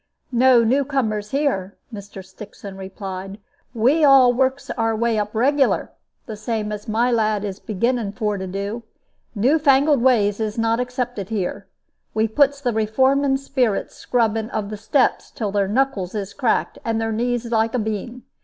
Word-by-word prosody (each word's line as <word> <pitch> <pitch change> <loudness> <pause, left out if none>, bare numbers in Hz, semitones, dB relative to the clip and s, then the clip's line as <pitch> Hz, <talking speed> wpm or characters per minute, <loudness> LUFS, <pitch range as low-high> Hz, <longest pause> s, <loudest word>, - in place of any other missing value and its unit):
"No 250 -1 +5
new 260 +5 +2
comers 220 -7 -2
here," 235 -9 -1 0.2
Mr. 200 -2 -9
Stixon 200 -1 -11
replied; 195 0 -7 0.4
"we 265 +8 +3
all 270 -3 +7
works 265 +2 0
our 225 -2 0
way 230 0 +1
up 210 +1 -3
regular, 275 +4 +2 0.3
the 220 - -6
same 215 0 -3
as 210 0 -6
my 230 +3 +1
lad 215 -3 +1
is 195 -1 -5
beginning 225 0 -1
for 210 -3 -1
to 190 - -5
do. 200 +5 -4 0.5
New 260 +10 +3
fangled 285 -1 +4
ways 215 -5 +3
is 215 0 -3
not 230 +1 +1
accepted 245 -5 -3
here. 200 -2 -3 0.5
We 220 +1 +2
puts 280 +5 +2
the 245 -4 0
reforming 265 +6 +2
spirits 260 -6 -1
scrubbing 225 -2 0
of 210 -3 -4
the - - -3
steps 245 +5 +1
till 210 -4 -4
their 200 -1 +1
knuckles 215 -4 -1
is 200 -1 -4
cracked 250 -5 0
and 225 -1 -1
their 225 0 -1
knees 240 +1 -2
like 225 +1 +1
a - - +1
bean. 220 +3 -4
225 Hz, 165 wpm, -21 LUFS, 210-255 Hz, 0.5 s, all